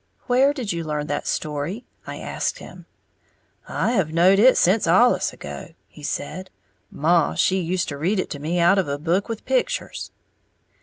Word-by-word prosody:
"Where 260 +3 +4
did 255 - -3
you 170 -1 -3
learn 150 -1 -3
that 145 -1 -3
story?" 155 - -3 0.2
I - - -6
asked - - -3
him. - - -12 0.8
"I - - -1
have 190 -10 0
knowed 180 +4 +4
it 255 +4 +6
sence 190 +1 +3
allus 235 +9 +4
ago," - - -9
he 150 - -16
said; 170 +5 -5 0.4
"Maw 165 +1 +2
she 190 0 +2
used 180 +2 -1
to 140 -1 -6
read 185 +6 0
it - - -3
to 145 - -5
me 160 +5 -2
out 175 +3 +4
of 185 - 0
a 140 0 -2
book 175 +8 -1
with 225 -1 -5
pictures." - - -1
180 Hz, 175 wpm, -23 LUFS, 155-210 Hz, 0.8 s, it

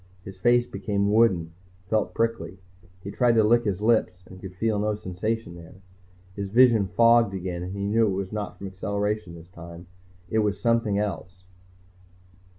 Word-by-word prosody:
His 95 +1 -11
face 120 0 +3
became 100 -3 -2
wooden, 95 -7 +2 0.3
felt 110 +1 -1
prickly. 115 -4 -2 0.5
He 100 - -6
tried 120 +1 +2
to 110 -1 +4
lick 120 +2 +3
his 100 -1 -2
lips 95 -5 +1
and 95 0 -14
could 95 -2 -9
feel 110 +1 -1
no 105 0 0
sensation 105 +1 -4
there. 85 0 -13 0.6
His 100 -1 -5
vision 115 -2 +4
fogged 115 +2 +3
again, 90 -2 -4
and 90 +1 -6
he 100 - -4
knew 110 +2 +2
it 95 -2 -1
was 95 -1 -4
not 105 -1 -5
from 100 - -9
acceleration 100 0 -3
this 85 +1 -14
time, 85 0 -11 0.4
it 110 - 0
was 105 -2 0
something 115 -3 +1
else. 95 -3 -4
100 Hz, 170 wpm, -25 LUFS, 95-115 Hz, 0.6 s, to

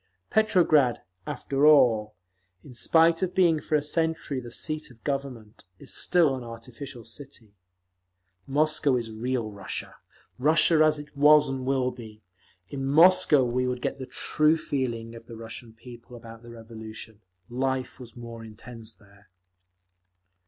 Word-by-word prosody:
Petrograd, 170 - +3 0.2
after 140 -1 -2
all, 110 -8 +4 0.5
in 135 - -13
spite 165 +7 +3
of 185 -1 -2
being 170 -4 +4
for 155 - -2
a 150 - +1
century 160 -3 -1
the 120 -1 -9
seat 155 +5 -5
of 120 -3 -19
Government, 135 -7 -5
is - - -6
still 170 -6 +3
an 130 - -7
artificial 120 +2 -10
city. 115 -3 -12 0.9
Moscow 150 -1 +1
is 115 -2 -3
real 115 0 -3
Russia, 100 -1 -6 0.4
Russia 155 +3 +4
as 155 -1 +3
it 150 0 -11
was 150 +1 +6
and 130 -1 -4
will 130 -2 +1
be; 110 -4 -12 0.5
in 135 -1 -5
Moscow 160 0 +5
we 125 +1 0
would 125 0 -3
get - - -3
the 130 - -6
true 155 +1 +2
feeling 120 -6 -3
of 115 0 -12
the 115 - -10
Russian 115 +1 -8
people 120 +1 -13
about 115 -1 -12
the 120 - -13
Revolution. 110 -1 -10 0.3
Life 130 +1 -3
was 120 -3 -12
more 115 -1 -9
intense 115 +1 -9
there. 100 -1 -22
125 Hz, 145 wpm, -26 LUFS, 115-150 Hz, 0.9 s, was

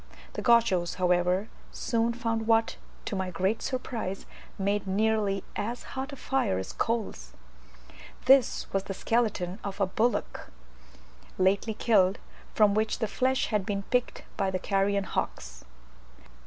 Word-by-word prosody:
The - - -4
Gauchos, 230 -8 +3
however, 180 +2 +2 0.2
soon 235 0 0
found 225 -2 -2
what, 225 0 +3 0.3
to - - -3
my 190 -1 -2
great 190 +5 0
surprise, 230 -7 -4 0.3
made 200 0 0
nearly 205 -1 +1
as 230 +4 -3
hot 270 +2 -4
a - - -6
fire 265 - 0
as 95 - -5
coals; 210 - -2 0.9
this 265 -1 +5
was 195 0 0
the 195 - -5
skeleton 210 -4 0
of 200 0 -5
a 195 - +4
bullock 225 +6 -1 0.9
lately 200 +4 +2
killed, 200 -4 +3 0.4
from 210 -2 +5
which 215 +1 +1
the 220 - -1
flesh 260 +4 0
had 210 -3 +1
been 200 0 -2
picked 250 -1 0
by 195 -2 +1
the 185 - -1
carrion 195 +1 +1
hawks. 60 - -4
205 Hz, 140 wpm, -28 LUFS, 190-230 Hz, 0.9 s, this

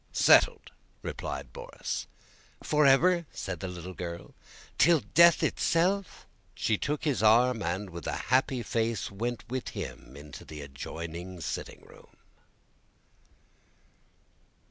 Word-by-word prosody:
"Settled!" - - +4 0.3
replied - - -5
Borís. 485 +1 -5 0.6
"Forever?" 150 +4 +4
said 95 -5 -5
the 95 - -4
little 90 0 -7
girl. 85 -1 -7 0.5
"Till 165 -3 +5
death 170 -1 +5
itself?" 185 +3 0 0.3
She 110 - +1
took 145 +6 -3
his 145 -7 0
arm 115 +2 +4
and 95 +2 -3
with 85 0 -7
a - - -1 0.2
happy 130 -1 +2
face 115 -4 -1
went 120 +5 -4
with 130 +1 -4
him 65 - -7
into 75 -1 -10
the 75 -1 -9
adjoining 85 +6 -7
sitting - - -5
room. - - -18
115 Hz, 115 wpm, -29 LUFS, -, 0.6 s, Till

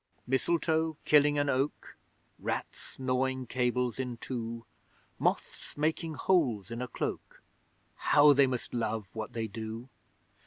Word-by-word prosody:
Mistletoe 160 +4 +1
killing 145 0 +5
an 145 0 +2
oak 135 +2 -1 0.4
Rats - - -4
gnawing 130 0 0
cables 125 0 0
in 125 -2 -3
two 115 -1 -5 0.5
Moths - - -1
making 160 +1 0
holes 130 - +1
in 115 +1 -4
a 125 - -2
cloak - - -5 0.5
How 145 0 +6
they 140 0 +5
must 125 -2 -3
love 110 -4 -2
what 110 -1 -5
they 115 -1 -2
do! 110 +3 -6
130 Hz, 125 wpm, -31 LUFS, 115-145 Hz, 0.5 s, How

